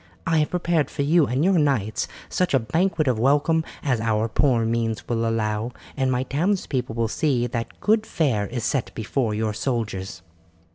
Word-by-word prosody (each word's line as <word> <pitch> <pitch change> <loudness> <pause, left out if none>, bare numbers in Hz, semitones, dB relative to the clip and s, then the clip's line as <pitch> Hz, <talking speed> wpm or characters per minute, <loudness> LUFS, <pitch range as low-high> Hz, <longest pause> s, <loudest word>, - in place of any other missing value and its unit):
I 165 -1 +2
have 150 - +1
prepared 170 -5 0
for 140 - -2
you 155 0 +4
and 130 +6 +1
your 190 -2 +4
knights 120 -8 0 0.2
such 180 -6 +1
a - - +5
banquet 165 - 0
of 125 -4 +1
welcome 145 +6 +3 0.2
as 125 -6 +1
our 110 0 +1
poor 120 0 +2
means 115 -1 -1
will 115 -1 0
allow, 110 +1 -1 0.2
and 130 -2 +1
my 125 0 +1
townspeople 140 - -1
will 115 -1 +1
see 125 0 0
that 115 -1 -4
good 220 +1 +2
fare 115 -11 0
is 120 0 -4
set 135 0 -1
before 110 0 -1
your 110 0 -1
soldiers." 105 -6 -3
125 Hz, 180 wpm, -24 LUFS, 115-150 Hz, 0.2 s, a